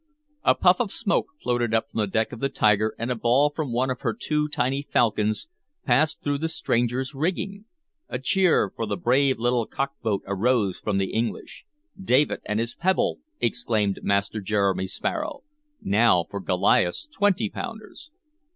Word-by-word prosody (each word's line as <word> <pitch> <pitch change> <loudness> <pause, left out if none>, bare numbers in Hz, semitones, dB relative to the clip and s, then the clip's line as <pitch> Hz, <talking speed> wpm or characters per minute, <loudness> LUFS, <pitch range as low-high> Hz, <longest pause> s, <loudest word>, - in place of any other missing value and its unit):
A - - +4
puff 180 0 +4
of 220 -5 -2
smoke 215 - 0 0.2
floated 120 -2 +1
up 115 +4 +1
from 125 - -5
the 105 - +1
deck 110 +3 0
of 120 - -8
the 135 - 0
Tiger, 110 -1 +2
and 115 +2 -3
a - - 0
ball 125 +6 +3
from 145 -4 -4
one 130 +2 0
of 130 - -5
her 115 -4 -1
two 150 +5 0
tiny 135 -1 0
falcons 110 - 0 0.4
passed 155 -1 +2
through 145 -1 0
the 160 +2 -1
stranger's 125 -1 -1
rigging. 190 +7 -2 0.4
A - - -2
cheer 165 - +2
for 115 - -3
the 100 -1 -2
brave 130 +2 +2
little 120 -1 +1
cockboat 135 -7 -2
arose 100 0 +1
from 105 -2 -1
the 95 -1 -1
English. 115 +1 -3 0.4
"David 140 -3 +2
and 105 +1 -1
his 115 +1 -2
pebble!" 190 +2 0 0.2
exclaimed 105 - 0
Master 100 +2 0
Jeremy 100 -2 0
Sparrow. 300 - -4 0.4
"Now - - +3
for - - -4
Goliath's 330 - +2
twenty 205 - +1
pounders!" 225 - -8
125 Hz, 165 wpm, -25 LUFS, 110-150 Hz, 0.4 s, A